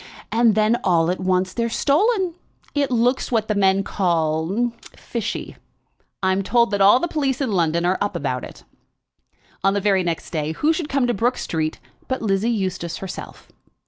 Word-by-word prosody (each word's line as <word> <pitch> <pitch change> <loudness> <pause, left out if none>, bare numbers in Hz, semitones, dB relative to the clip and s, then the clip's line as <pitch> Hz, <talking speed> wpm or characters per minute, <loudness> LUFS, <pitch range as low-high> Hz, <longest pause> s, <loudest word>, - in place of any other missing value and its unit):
And 230 -2 +4
then 215 +2 +3
all 170 -2 +3
at 185 - -3
once, 185 0 0
they're 235 -1 -1
stolen. 370 - +2 0.4
It 285 -2 +1
looks 250 +2 +1
what 220 -3 +1
the 215 - +1
men 195 -1 +3
call 175 +5 0 0.2
fishy. 230 -1 -5 0.7
I'm 190 +1 +2
told 235 +4 +2
that 200 -1 0
all 205 +5 +7
the 345 - -1
police 275 -5 -1
in 265 -5 -1
London 170 -2 +1
are 185 +1 +1
up 205 -2 -1
about 135 -6 -2
it." - - -10 1.0
On 195 +1 +3
the - - +2
very 195 -1 +2
next 170 -2 -3
day 155 -1 -2
who 305 - +2
should 320 -2 -3
come 275 -2 +1
to 240 - +1
Brook 240 +5 0
Street, 160 -1 -2 0.3
but 260 - -1
Lizzie 200 +2 +1
Eustace 185 -6 -2
herself. 190 -2 -8
200 Hz, 175 wpm, -22 LUFS, 180-240 Hz, 1.0 s, all